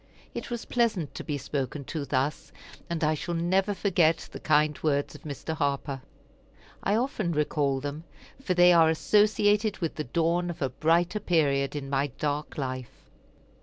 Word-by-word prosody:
It - - -5
was 240 -1 -4
pleasant 220 - 0
to - - -6
be 145 -2 -3
spoken 140 0 -3
to 145 +1 -4
thus, 140 +2 -1 0.4
and 170 -1 -2
I 155 +1 +3
shall 170 +3 -3
never 190 +4 +1
forget 170 -5 +2
the - - -7
kind 150 -1 +3
words 145 -2 0
of 150 - -12
Mr. 150 +2 -5
Harper. 140 -2 -2 0.8
I 200 - +1
often 220 -7 -1
recall 145 -2 +1
them, 145 +3 -5 0.4
for 185 -9 -1
they 175 0 +7
are 165 -2 +6
associated 210 +4 +3
with 165 -3 -2
the 155 - -4
dawn 170 +6 0
of 175 - -6
a 135 - 0
brighter 170 - +1
period 145 -7 +1
in 140 -2 -4
my 140 +1 +1
dark 150 0 -2
life. 130 -3 -6
155 Hz, 165 wpm, -27 LUFS, 145-175 Hz, 0.8 s, they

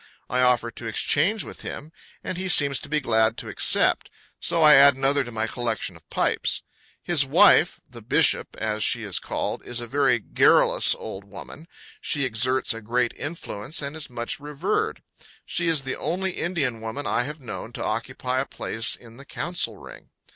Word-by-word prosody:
I 125 - +2
offer 125 -2 +2
to 115 +1 -8
exchange 165 - +1
with - - -10
him, 155 +2 -7 0.3
and - - -4
he 185 +1 -3
seems 140 -5 +5
to - - -11
be 150 +1 +1
glad 110 -4 +1
to - - -7
accept; - - +2 0.3
so 165 -1 +2
I 150 -1 +8
add 140 0 +7
another 135 +1 +2
to 120 - -8
my 110 -1 -1
collection 115 -6 -3
of 80 - -19
pipes. - - 0 0.4
His - - +3
wife, - - +5
"The - - -12
Bishop," - - +2
as 110 -1 -2
she 120 -1 +1
is 100 -4 -1
called, - - -4
is 120 0 -3
a 120 - -5
very 135 +1 +2
garrulous 110 - +3
old 95 - -8
woman; 100 +10 -11 0.3
she 145 -2 -1
exerts 130 +2 0
a 115 - -8
great 120 +2 0
influence, 145 -4 -5
and 140 +2 -5
is 155 -3 -6
much 120 -1 -4
revered. 150 +8 -2 0.4
She 170 -1 -1
is 160 -4 +1
the 130 - -4
only 190 +2 -2
Indian 145 -11 -2
woman 115 +6 -5
I 120 - 0
have 150 +3 -6
known 120 -3 -7
to - - -5
occupy 125 +3 -2
a 135 - -2
place 115 +1 0
in 115 -1 -16
the 140 - -12
council 155 - -2
ring. - - -13
130 Hz, 185 wpm, -24 LUFS, 115-150 Hz, 0.4 s, I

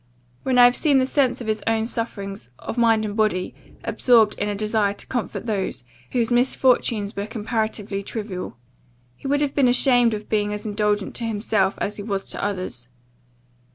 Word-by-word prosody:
when 260 -1 0
I 245 - +9
have 245 0 +5
seen 290 -4 +3
the 260 - +3
sense 265 -2 +1
of - - -5
his 215 -1 -1
own 225 0 +2
sufferings, 200 - -4
of - - -6
mind 225 -2 +3
and 205 -1 -4
body, 215 -4 0 0.3
absorbed 225 -4 +4
in 205 - 0
a 205 - -2
desire 210 -1 +1
to - - -9
comfort 245 -2 -4
those, 200 - -2 0.3
whose 240 -1 +1
misfortunes 240 -4 +2
were 200 +1 -3
comparatively 215 -2 -2
trivial. 200 - -6 0.6
He 270 - -8
would 285 +1 +1
have 290 -1 0
been 275 -3 +3
ashamed 245 -2 +4
of 210 0 -8
being 210 -1 0
as 210 +2 -5
indulgent 210 -1 0
to 235 - -2
himself, 205 -3 0
as 205 - -2
he - - -5
was 200 -2 -3
to - - -3
others. 185 -12 -3
215 Hz, 185 wpm, -23 LUFS, 205-240 Hz, 0.6 s, I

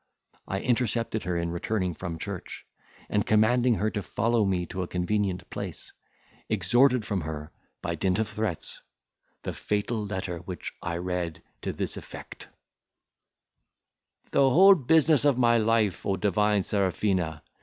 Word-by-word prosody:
I 95 +1 -2
intercepted 115 -2 0
her 90 -1 -1
in 85 0 -1
returning 90 +1 -1
from 85 0 -5
church, 95 +2 -7 0.4
and, 105 -1 +1
commanding 120 +3 +3
her 110 +1 0
to 105 - -2
follow 110 +3 +1
me 90 -2 0
to 95 +2 -5
a 90 - -3
convenient 95 0 -1
place, - - -7 0.6
extorted 120 +5 +3
from 100 -3 -1
her, 75 -1 -6 0.3
by - - -1
dint 95 0 0
of 110 -1 0
threats, 105 -6 -4 0.6
the - - -3
fatal 105 +2 -1
letter, 95 -4 -4
which 90 0 -7
I 85 -1 -3
read 90 -2 -3 0.2
to - - -2
this - - -3
effect:— - - -10 1.8
"The 135 -1 +4
whole 190 +8 +8
business 155 -2 +4
of 145 -4 +3
my 120 -2 +4
life, 110 -3 +1
O 100 - 0
divine 105 0 +2
Serafina! 95 -6 0
105 Hz, 145 wpm, -27 LUFS, 90-115 Hz, 1.8 s, whole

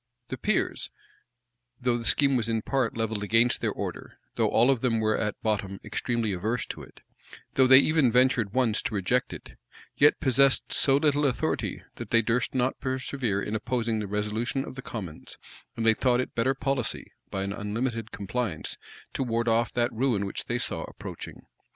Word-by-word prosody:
The - - -4
peers, - - 0 0.9
though 125 -1 +1
the 120 -1 -4
scheme 140 +1 +3
was 115 -2 +1
in 115 -1 0
part 130 -5 0
levelled 110 -2 -1
against 115 +4 +2
their - - +1
order; - - -6 0.2
though - - +2
all 120 +4 +4
of 130 -4 0
them 115 -3 +1
were 110 0 +2
at 105 -2 -2
bottom 100 -3 -1
extremely 115 -4 -1
averse 110 +7 -2
to - - -6
it; - - -14 0.5
though 130 -1 +4
they 130 0 +9
even 145 -3 +4
ventured 125 -4 +3
once 120 -3 +1
to - - -3
reject 125 +7 +1
it; - - -10 0.4
yet 145 +1 +5
possessed 135 -1 +3
so 135 -1 +5
little 145 0 +2
authority, 130 - -2
that - - -7
they 115 0 +4
durst 115 +4 0
not 130 +1 0
persevere 130 -5 -2
in 105 - -4
opposing 115 -1 -1
the 105 - -3
resolution 110 +7 -2
of - - -8
the 135 - -7
commons; 95 -11 -8 0.4
and 115 - -1
they 110 - +6
thought 125 +1 +2
it 130 - -3
better 130 +4 +1
policy, 135 -3 -2 0.2
by 95 - -3
an 100 +1 -3
unlimited 115 +2 -3
compliance, 100 -4 -4 0.4
to - - -3
ward 115 -2 0
off 115 0 +2
that 120 0 0
ruin 115 -4 +1
which 100 - -5
they - - -1
saw - - -2
approaching. - - -9
120 Hz, 185 wpm, -27 LUFS, 110-130 Hz, 0.9 s, they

